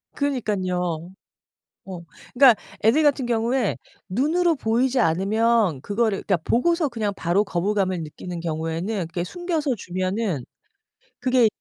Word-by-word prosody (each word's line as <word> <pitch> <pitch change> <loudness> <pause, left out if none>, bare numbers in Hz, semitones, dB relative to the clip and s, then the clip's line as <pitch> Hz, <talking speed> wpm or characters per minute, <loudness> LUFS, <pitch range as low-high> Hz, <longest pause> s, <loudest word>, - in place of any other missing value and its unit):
그러니깐요. 185 - -2 0.8
어. 185 -3 -7 0.3
그러니까 250 -3 +7 0.3
애들 230 +9 +4
같은 285 -4 +2
경우에 235 0 0 0.3
눈으로 320 - +2
보이지 245 +2 +1
않으면 200 - +2
그거를 210 -1 0
그러니까 190 -4 +1
보고서 335 +5 +2
그냥 220 -5 -2
바로 180 +4 +1
거부감을 190 -1 -1
느끼는 170 +3 -7
경우에는 165 +5 -3
그렇게 175 +1 -3
숨겨서 330 - -2
주면은 185 - -2 0.8
그게 255 -3 +3
215 Hz, 320 characters per minute, -23 LUFS, 180-255 Hz, 0.8 s, 그러니까